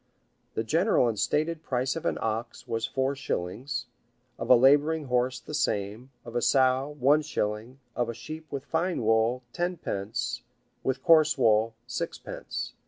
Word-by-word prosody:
The 110 - 0
general 165 - +3
and 110 -3 -2
stated 155 +2 0
price 130 -3 -1
of 165 +1 -3
an - - 0
ox 115 +1 -3
was 115 0 -1
four 135 +3 -1
shillings; 125 +1 -3 0.5
of - - -4
a 125 - +9
laboring 145 +5 +4
horse, 125 0 0
the 150 - -10
same; 110 -4 -1 0.2
of 120 0 -9
a 120 - +1
sow, 130 +2 +3
one 145 +4 +5
shilling; 115 -3 -3 0.2
of 120 -1 0
a 115 - -4
sheep 155 +7 -8
with 140 -1 -4
fine 170 -3 -1
wool, 115 +3 +2
tenpence 120 - -3 0.4
with 130 0 -1
coarse 155 -3 +5
wool, 110 -2 +3
sixpence. 125 - -5
130 Hz, 155 wpm, -28 LUFS, 115-150 Hz, 0.5 s, a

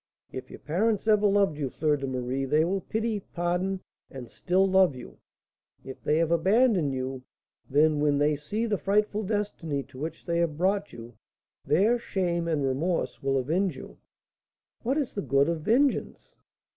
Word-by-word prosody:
"If 130 0 -7
your - - -9
parents 210 +7 -1
ever 210 -1 +4
loved 195 -7 +2
you, 140 -3 -1
Fleur 150 +3 +1
de 135 -1 -4
Marie, 130 +1 -2
they 155 +4 +2
will 190 +2 -1
pity, 220 +2 -2
pardon, 180 +1 -2 0.3
and 130 -3 -9
still 185 +9 +1
love 190 -6 +4
you. 125 - -11 0.7
If 130 - -9
they 150 - +1
have 165 0 +1
abandoned 190 - +3
you, 130 0 -4 0.5
then, 150 +2 +3
when 145 -1 +2
they 150 +1 +2
see 205 +11 -3
the 210 -3 -1
frightful 210 +1 +1
destiny 195 -9 -2
to 130 -1 -14
which 160 +2 -6
they 170 0 0
have 165 -3 0
brought 195 +3 0
you, 115 +1 -11 0.5
their 225 +6 +3
shame 175 -6 -1
and 155 -4 0
remorse 155 +7 -1
will 135 0 +1
avenge 165 +5 0
you." - - -11 0.8
"What 260 +5 0
is 285 -5 -2
the 200 - -3
good 140 +1 +2
of 165 -2 -1
vengeance?" 275 - 0
170 Hz, 170 wpm, -27 LUFS, 145-200 Hz, 0.8 s, ever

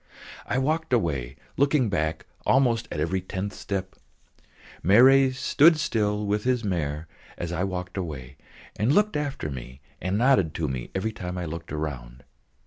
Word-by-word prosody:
I 120 - 0
walked 155 +2 0
away, 70 - 0 0.2
looking 140 -2 +3
back 80 -5 -1 0.2
almost 120 -4 +2
at - - -3
every 90 +5 0
tenth 95 +2 -4
step. 95 -1 -4 0.9
Marey 130 - +6
stood 145 +5 +4
still 105 -7 0
with 105 +1 0
his 125 -2 +1
mare 80 -5 -2 0.3
as 85 -1 -4
I 90 +1 -1
walked 90 -1 -5
away, 70 -7 -5 0.4
and 110 +5 +2
looked 210 0 +3
after 140 - -3
me 65 0 -8 0.2
and 95 +3 -1
nodded 115 - +3
to 80 - -1
me 65 -2 -4
every 100 +4 -1
time 90 -4 -6
I 90 - -3
looked 85 +1 -7
round. 65 -5 -5
95 Hz, 155 wpm, -26 LUFS, 80-125 Hz, 0.9 s, Marey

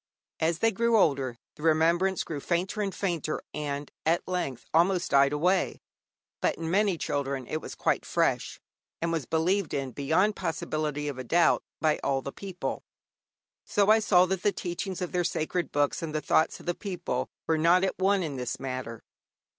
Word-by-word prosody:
As 160 +1 +1
they 225 +4 +3
grew 235 +2 +2
older 135 - +2 0.2
the - - -14
remembrance 165 +4 +3
grew 155 -3 -5
fainter 180 +7 -1
and 195 -2 -2
fainter, 170 -5 -1
and 145 -1 -4
at 165 +2 +1
length 180 -9 -3
almost 175 +2 +3
died 140 0 +5
away. 180 +6 +1 0.6
But - - +2
in 165 +1 -4
many 200 -2 +2
children 140 -3 -2
it 155 +5 -3
was - - -8
quite - - 0
fresh, - - 0 0.4
and 170 0 -1
was 160 -6 -2
believed 170 +3 +1
in 135 -2 -2
beyond 165 - +1
possibility 150 -2 -2
of 140 -3 -4
a - - -4
doubt 170 +7 +3 0.2
by 155 -1 +2
all 135 -1 0
the 140 - -5
people. 190 +1 -5 0.8
So 205 0 +3
I 220 - +6
saw 185 -4 +5
that 190 0 -2
the 205 - +3
teachings 185 0 -4
of 180 - -4
their 180 -1 +1
sacred 175 0 -1
books 145 0 +1
and 155 -2 -4
the - - +2
thoughts 160 - +2
of - - -14
the 175 - 0
people 175 -10 -3 0.2
were 160 -1 +1
not 175 +3 +5
at 190 - -1
one 195 0 +3
in 145 -5 -4
this 125 -1 -3
matter. 130 -4 -5
165 Hz, 185 wpm, -28 LUFS, 145-185 Hz, 0.8 s, I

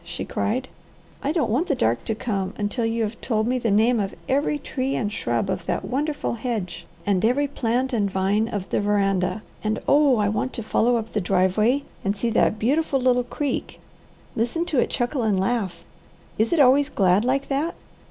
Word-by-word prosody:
she - - -6
cried. 255 +5 -1 0.5
"I 280 - 0
don't 305 -9 0
want 290 +11 +1
the 285 - +1
dark 115 - 0
to 225 - -1
come, 195 -4 -3
until 215 +3 -1
you 225 0 0
have 220 +1 -4
told 220 -3 0
me 250 +2 0
the 235 - 0
name 225 +4 +3
of 195 -2 -2
every 285 +2 +1
tree 270 -1 -3
and 210 -2 -2
shrub - - -1
of - - -3
that - - -1
wonderful 290 +2 -1
hedge, 215 -7 -4 0.2
and 195 -3 +1
every 265 +6 +2
plant 255 -1 -1
and 205 -4 +1
vine 195 +3 +1
of 205 -5 -4
the - - +1
veranda; 195 -1 +1 0.2
and 215 0 0
oh 285 -3 +5
I 210 -1 +2
want 215 +5 -1
to 230 - -4
follow 235 +3 +2
up 230 -1 -3
the 210 - -1
driveway 195 +8 +2 0.2
and 200 +1 -1
see 230 +3 -1
that 215 -1 +2
beautiful 275 +5 +1
little 250 -1 +3
creek 275 +2 -3 0.6
listen 245 +9 0
to 295 -7 0
it - - +2
chuckle 245 +1 -1
and 210 -4 +1
laugh! 190 -5 -1 0.6
Is 220 +1 +2
it 340 - +2
always 280 +1 +5
glad 190 +1 +3
like 270 +3 0
that? 290 +5 -1
230 Hz, 200 wpm, -24 LUFS, 205-260 Hz, 0.6 s, oh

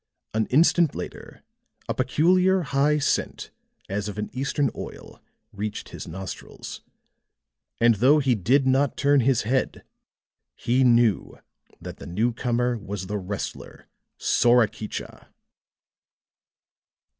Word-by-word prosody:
An 110 0 0
instant 165 +3 +3
later, - - -8 0.4
a - - -1
peculiar, 180 +8 +2
high 140 +2 +2
scent 145 - -1 0.4
as 100 +1 -3
of 100 - -8
an 105 - -4
Eastern 135 +1 -1
oil - - -9 0.3
reached 105 +1 -5
his - - -8
nostrils; 95 +3 -8 1.0
and 115 0 +5
though 130 +8 +4
he 135 -4 +2
did 125 +7 +2
not 135 +1 +2
turn 145 0 +3
his 130 -1 +2
head, 130 +4 -1 0.7
he 125 +3 +1
knew 120 -5 +3 0.4
that - - -9
the - - -10
newcomer 120 +4 0
was 100 -2 -6
the 105 +2 -3
wrestler, 100 +1 -6 0.3
Sorakicha. 115 -3 +1
120 Hz, 110 wpm, -24 LUFS, 105-140 Hz, 1.0 s, and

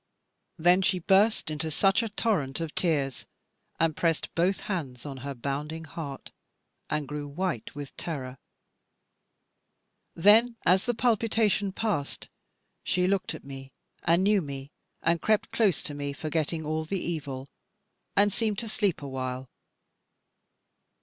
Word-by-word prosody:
Then 175 +3 +5
she 185 0 +3
burst 195 0 +3
into 155 +1 -2
such 195 +8 +3
a 230 - -2
torrent 200 -11 0
of 165 -2 -4
tears, 140 -7 0 0.5
and 165 -2 +2
pressed 165 -2 0
both 180 +3 +1
hands 140 - -4
on 140 -2 -6
her 140 +2 -5
bounding 145 +5 -4
heart, 145 -3 -7 0.6
and 150 -2 -1
grew 150 0 -4
white 155 - -3
with 145 -1 -7
terror. 130 -6 -4 1.8
Then 220 +7 +6
as 185 +5 +4
the 240 - +1
palpitation 220 -4 +2
passed, 195 -9 -2 0.5
she 180 0 +1
looked 190 0 0
at - - -11
me 135 -1 -9 0.3
and 170 +3 +3
knew 205 0 +4
me, 140 -2 -7 0.3
and 165 -1 +3
crept 215 -1 +1
close 205 -8 +2
to 150 - -4
me, 145 0 -3
forgetting 160 +1 -2
all 155 +1 -1
the 195 +5 -2
evil, 140 -6 -4 0.7
and 205 0 +4
seemed 215 -3 0
to 230 +1 -2
sleep 200 -8 0
awhile. 130 -1 -4
165 Hz, 135 wpm, -28 LUFS, 140-195 Hz, 1.8 s, Then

